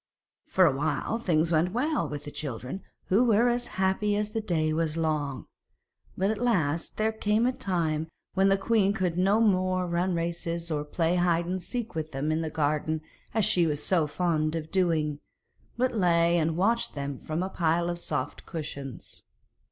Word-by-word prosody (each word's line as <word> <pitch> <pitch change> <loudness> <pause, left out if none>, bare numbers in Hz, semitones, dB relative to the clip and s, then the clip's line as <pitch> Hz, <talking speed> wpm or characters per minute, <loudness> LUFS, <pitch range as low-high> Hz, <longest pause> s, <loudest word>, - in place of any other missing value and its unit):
For 185 - +4
a 145 -5 +3
while 150 - -1
things 170 -6 +1
went 170 +3 +2
well 295 +6 0
with 145 -1 -5
the 145 - -6
children, 135 - -5 0.3
who 205 +6 +4
were 235 0 +4
as 240 0 0
happy 190 +2 +1
as 210 0 -1
the 225 0 -2
day 160 -6 0
was 160 0 0
long, 150 -4 -1 0.7
but 195 +3 +2
at 220 - -3
last 170 -10 0
there 220 +1 +2
came 220 +1 +1
a 250 - +3
time 165 -8 -1 0.3
when 190 +1 +3
the 195 - +4
queen 200 -1 +2
could 185 -5 -1
no 195 +4 +3
more 185 -4 +2
run 175 +1 0
races 170 0 -3
or 150 -1 0
play 165 +3 0
at 175 - +2
hide 170 -1 +2
and 185 +1 -2
seek 230 +4 -4
with 160 -2 -4
them 140 +3 -1
in 160 +1 0
the 160 - -2
garden 155 +1 0 0.3
as 220 -4 +3
she 175 -2 +4
was 150 -1 -2
so 170 -5 +2
fond 155 -1 0
of 160 -1 -5
doing, 160 -6 +1 0.6
but 255 +1 +2
lay 170 -4 +3
and 160 0 0
watched 230 +6 +1
them 140 -1 -4
from 160 +3 -3
a 190 - -3
pile 170 -1 +1
of 175 0 -3
soft 135 -4 -3
cushions. 140 - -7
170 Hz, 190 wpm, -28 LUFS, 155-195 Hz, 0.7 s, For